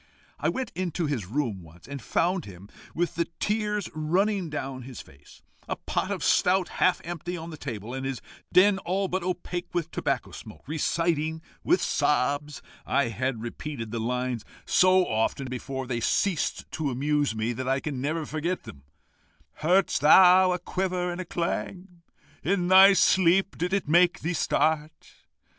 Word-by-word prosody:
I -, -, +1 dB
went 260 Hz, -1 st, -3 dB
into 175 Hz, -1 st, -2 dB
his 130 Hz, -11 st, -2 dB
room 115 Hz, -5 st, -2 dB
once, 85 Hz, +1 st, -16 dB
and 140 Hz, -1 st, -7 dB
found 175 Hz, -, 0 dB
him 95 Hz, 0 st, -12 dB, 0.3 s
with 175 Hz, 0 st, 0 dB
the 170 Hz, +1 st, -1 dB
tears 210 Hz, -1 st, -1 dB
running 180 Hz, +4 st, 0 dB
down 135 Hz, -3 st, -5 dB
his 125 Hz, 0 st, -9 dB
face, 70 Hz, +1 st, -16 dB, 0.2 s
a -, -, -2 dB
pot -, -, -3 dB
of -, -, -3 dB
stout 185 Hz, 0 st, +3 dB
half 185 Hz, -, +1 dB
empty 175 Hz, +1 st, -5 dB
on 165 Hz, +1 st, -7 dB
the -, -, -7 dB
table, 115 Hz, -5 st, -6 dB
and 135 Hz, 0 st, -4 dB
his 135 Hz, -2 st, -3 dB, 0.3 s
den 190 Hz, +2 st, +5 dB
all 195 Hz, +1 st, -1 dB
but 185 Hz, +1 st, -2 dB
opaque 180 Hz, 0 st, -4 dB
with 170 Hz, -1 st, -1 dB
tobacco 135 Hz, -3 st, -2 dB
smoke, 110 Hz, -2 st, -11 dB
reciting, 160 Hz, +1 st, 0 dB, 0.2 s
with 180 Hz, -, +2 dB
sobs 145 Hz, +1 st, 0 dB, 0.2 s
I 140 Hz, -3 st, +1 dB
had 120 Hz, 0 st, -2 dB
repeated 120 Hz, -1 st, -6 dB
the 115 Hz, -, -3 dB
lines 125 Hz, 0 st, -2 dB, 0.2 s
so 185 Hz, 0 st, +4 dB
often 115 Hz, +5 st, -1 dB
before 130 Hz, +1 st, -5 dB
they 120 Hz, -2 st, -2 dB
ceased 170 Hz, -, 0 dB
to 155 Hz, -3 st, -2 dB
amuse 145 Hz, 0 st, 0 dB
me, 110 Hz, +2 st, -1 dB
that 130 Hz, +2 st, -4 dB
I 135 Hz, +1 st, +2 dB
can 135 Hz, -3 st, -4 dB
never 155 Hz, +3 st, -2 dB
forget 165 Hz, +5 st, -3 dB
them 70 Hz, -, -11 dB, 0.8 s
'Heard'st 180 Hz, 0 st, +2 dB
thou 185 Hz, +4 st, +7 dB
a 180 Hz, -, 0 dB
quiver 180 Hz, -1 st, -2 dB
and 175 Hz, 0 st, -6 dB
clang? 175 Hz, +1 st, -4 dB, 0.4 s
In 180 Hz, -2 st, 0 dB
thy 190 Hz, +1 st, +9 dB
sleep 190 Hz, 0 st, +3 dB
did 180 Hz, +2 st, -2 dB
it 195 Hz, -4 st, 0 dB
make 175 Hz, +3 st, +4 dB
thee 165 Hz, +3 st, -1 dB
start? 155 Hz, -1 st, -1 dB
155 Hz, 165 wpm, -26 LUFS, 130-180 Hz, 0.8 s, thy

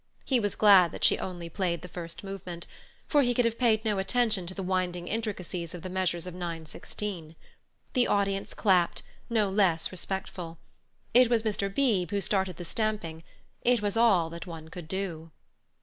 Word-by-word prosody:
He 260 Hz, -3 st, +3 dB
was 205 Hz, -3 st, 0 dB
glad 195 Hz, -5 st, +7 dB
that -, -, -6 dB
she -, -, +5 dB
only 175 Hz, -2 st, -5 dB
played 170 Hz, -1 st, -2 dB
the -, -, -6 dB
first 170 Hz, 0 st, -8 dB
movement, 185 Hz, -3 st, -6 dB, 0.4 s
for 290 Hz, -, +4 dB
he 245 Hz, -2 st, +2 dB
could 245 Hz, -, +3 dB
have 230 Hz, 0 st, 0 dB
paid 225 Hz, -3 st, +3 dB
no 210 Hz, -3 st, +1 dB
attention 210 Hz, -2 st, +1 dB
to 185 Hz, -, -7 dB
the 195 Hz, -, -4 dB
winding 180 Hz, -1 st, -1 dB
intricacies 185 Hz, -6 st, -3 dB
of 175 Hz, -, -9 dB
the 185 Hz, -, -5 dB
measures 180 Hz, -2 st, -1 dB
of 180 Hz, -, -6 dB
nine 170 Hz, -2 st, -5 dB
sixteen. 165 Hz, -1 st, -6 dB, 0.6 s
The 250 Hz, -2 st, +3 dB
audience 195 Hz, -1 st, 0 dB
clapped, 185 Hz, -5 st, +3 dB, 0.3 s
no 220 Hz, -3 st, +2 dB
less 190 Hz, -5 st, +2 dB
respectful. 185 Hz, -2 st, -5 dB, 0.6 s
It 250 Hz, 0 st, +7 dB
was 230 Hz, -2 st, +2 dB
Mr. 205 Hz, -2 st, -1 dB
Beebe 200 Hz, -, +2 dB
who -, -, +2 dB
started 190 Hz, -4 st, 0 dB
the 175 Hz, -, -6 dB
stamping; 190 Hz, -6 st, -2 dB, 0.4 s
it 240 Hz, -3 st, +3 dB
was 205 Hz, 0 st, 0 dB
all 195 Hz, -8 st, +4 dB
that 170 Hz, +2 st, -7 dB
one 160 Hz, -2 st, -8 dB
could 170 Hz, -1 st, -8 dB
do. 170 Hz, -3 st, -4 dB
190 Hz, 180 wpm, -29 LUFS, 175-215 Hz, 0.6 s, glad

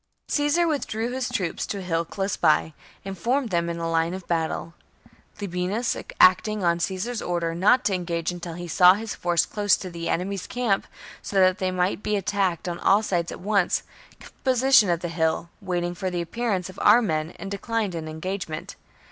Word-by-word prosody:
Caesar 295 Hz, +4 st, +2 dB
withdrew 240 Hz, -6 st, -2 dB
his 255 Hz, 0 st, -2 dB
troops 180 Hz, -5 st, -2 dB
to 205 Hz, -, -3 dB
a -, -, -5 dB
hill 165 Hz, -2 st, 0 dB
close 195 Hz, +3 st, -3 dB
by, 160 Hz, -1 st, +2 dB, 0.3 s
and 195 Hz, -2 st, -6 dB
formed 250 Hz, +3 st, 0 dB
them 170 Hz, -1 st, 0 dB
in 170 Hz, -, -3 dB
line 165 Hz, +1 st, 0 dB
of 190 Hz, -2 st, -8 dB
battle. 165 Hz, 0 st, -2 dB, 0.7 s
Labienus, 200 Hz, +4 st, -1 dB, 0.2 s
acting 200 Hz, +3 st, +5 dB
on 170 Hz, 0 st, +2 dB
Caesar's 195 Hz, +7 st, -2 dB
order 170 Hz, -2 st, -1 dB
not 205 Hz, +9 st, +3 dB
to 200 Hz, -, +2 dB
engage 170 Hz, -2 st, -2 dB
until 175 Hz, -1 st, -7 dB
he 175 Hz, 0 st, -6 dB
saw 180 Hz, +2 st, +6 dB
his 220 Hz, +1 st, -5 dB
force 175 Hz, -1 st, +1 dB
close 205 Hz, -1 st, +2 dB
to 185 Hz, -, -7 dB
the 170 Hz, 0 st, -4 dB
enemy's 190 Hz, +1 st, -2 dB
camp, 240 Hz, -6 st, 0 dB, 0.3 s
so -, -, -7 dB
that 185 Hz, +1 st, +4 dB
they 185 Hz, -, 0 dB
might 185 Hz, +2 st, 0 dB
be 210 Hz, -, -1 dB
attacked 195 Hz, -3 st, -1 dB
on 175 Hz, 0 st, -3 dB
all 205 Hz, +3 st, +4 dB
sides 175 Hz, -5 st, -1 dB
at -, -, -8 dB
once, 200 Hz, -2 st, +1 dB, 0.4 s
kept -, -, -16 dB
possession 260 Hz, -5 st, +5 dB
of 170 Hz, -1 st, +1 dB
the 175 Hz, -, -2 dB
hill, 165 Hz, 0 st, -1 dB
waiting 175 Hz, -2 st, -2 dB
for 185 Hz, +1 st, -3 dB
the 180 Hz, -1 st, -3 dB
appearance 190 Hz, +1 st, -2 dB
of 185 Hz, -, -11 dB
ou* 210 Hz, +3 st, +7 dB
men, 160 Hz, -4 st, -2 dB
and 195 Hz, -, -7 dB
declined 210 Hz, -1 st, -2 dB
an 160 Hz, -2 st, -5 dB
engagement. 160 Hz, 0 st, -5 dB
185 Hz, 190 wpm, -25 LUFS, 170-210 Hz, 0.7 s, ou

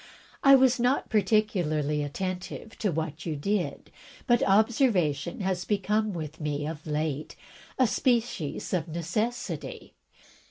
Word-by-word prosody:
I 275 Hz, -1 st, +9 dB
was 260 Hz, -2 st, +4 dB
not 250 Hz, +3 st, +1 dB
particularly 180 Hz, -9 st, +1 dB
attentive 185 Hz, +8 st, -5 dB
to 205 Hz, -4 st, +1 dB
what 160 Hz, 0 st, -3 dB
you 160 Hz, -, -1 dB
did; 195 Hz, +6 st, -2 dB, 0.3 s
but 240 Hz, -2 st, +3 dB
observation 195 Hz, -, +2 dB
has 185 Hz, -2 st, -1 dB
become 210 Hz, +2 st, 0 dB
with 160 Hz, -3 st, -6 dB
me, 145 Hz, -1 st, -2 dB
of 155 Hz, 0 st, -6 dB
late, 150 Hz, -1 st, -2 dB, 0.4 s
a 260 Hz, -, +5 dB
species 230 Hz, -, 0 dB
of 170 Hz, -3 st, 0 dB
necessity. 200 Hz, +9 st, -3 dB
185 Hz, 120 wpm, -28 LUFS, 155-220 Hz, 0.4 s, I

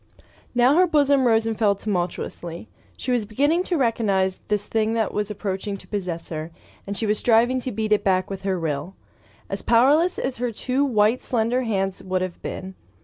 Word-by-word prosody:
Now 250 Hz, +5 st, +5 dB
her 365 Hz, 0 st, +5 dB
bosom 285 Hz, -4 st, +3 dB
rose 225 Hz, -1 st, +3 dB
and 225 Hz, -1 st, -1 dB
fell 205 Hz, -2 st, +2 dB
tumultuously. 175 Hz, -2 st, -4 dB, 0.3 s
She 255 Hz, -, -3 dB
was 235 Hz, -4 st, 0 dB
beginning 290 Hz, -, +2 dB
to 355 Hz, -, 0 dB
recognize 205 Hz, -7 st, +1 dB
this 205 Hz, -1 st, 0 dB
thing 220 Hz, +1 st, 0 dB
that 225 Hz, -1 st, 0 dB
was 210 Hz, 0 st, -1 dB
approaching 200 Hz, 0 st, -3 dB
to -, -, -14 dB
possess 180 Hz, -5 st, -4 dB
her, 155 Hz, 0 st, -5 dB, 0.4 s
and 200 Hz, 0 st, -4 dB
she 225 Hz, -, -1 dB
was 210 Hz, 0 st, +1 dB
striving 240 Hz, +2 st, +3 dB
to 255 Hz, 0 st, -4 dB
beat 215 Hz, 0 st, -3 dB
it 210 Hz, -, +1 dB
back 185 Hz, -1 st, +2 dB
with 195 Hz, -1 st, -6 dB
her 190 Hz, -2 st, -1 dB
will 160 Hz, +3 st, -3 dB, 0.3 s
— -, -, -30 dB
as -, -, -4 dB
powerless 290 Hz, +10 st, +4 dB
as 260 Hz, -1 st, -3 dB
her 245 Hz, 0 st, -1 dB
two 255 Hz, +5 st, 0 dB
white 225 Hz, -2 st, +2 dB
slender 240 Hz, +1 st, 0 dB
hands 195 Hz, -5 st, -1 dB
would 185 Hz, 0 st, -1 dB
have 185 Hz, -2 st, -6 dB
been. 190 Hz, 0 st, -6 dB
215 Hz, 200 wpm, -23 LUFS, 190-245 Hz, 0.4 s, Now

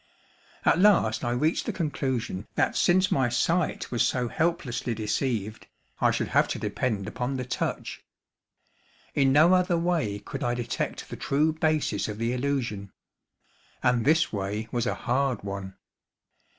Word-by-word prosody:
At -, -, +4 dB
last 180 Hz, -, +4 dB
I 120 Hz, -, 0 dB
reached 150 Hz, +7 st, 0 dB
the -, -, +1 dB
conclusion 130 Hz, -, -2 dB
that -, -, +1 dB
since 185 Hz, +2 st, +3 dB
my 130 Hz, -3 st, +2 dB
sight 165 Hz, +8 st, 0 dB
was 120 Hz, -, 0 dB
so 125 Hz, -2 st, +1 dB
helplessly 150 Hz, -8 st, -1 dB
deceived, 110 Hz, -1 st, -2 dB, 0.3 s
I -, -, +4 dB
should -, -, -1 dB
have -, -, +3 dB
to -, -, -3 dB
depend 105 Hz, -6 st, -2 dB
upon 125 Hz, +4 st, -3 dB
the 125 Hz, -, -3 dB
touch. 125 Hz, -, -3 dB, 1.1 s
In 135 Hz, -2 st, +3 dB
no 155 Hz, +6 st, +6 dB
other 180 Hz, -1 st, +3 dB
way 165 Hz, -12 st, 0 dB
could 105 Hz, -, -6 dB
I 120 Hz, 0 st, 0 dB
detect 120 Hz, -1 st, -3 dB
the -, -, -5 dB
true 150 Hz, +3 st, +1 dB
basis 155 Hz, -9 st, 0 dB
of 105 Hz, -1 st, -5 dB
the 115 Hz, +2 st, -1 dB
illusion; 125 Hz, -7 st, -2 dB, 0.9 s
and 125 Hz, -2 st, +3 dB
this 160 Hz, +2 st, +3 dB
way 105 Hz, +2 st, -3 dB
was 120 Hz, -1 st, -1 dB
a -, -, 0 dB
hard 130 Hz, -2 st, 0 dB
one. 100 Hz, -1 st, -6 dB
125 Hz, 150 wpm, -27 LUFS, 110-155 Hz, 1.1 s, no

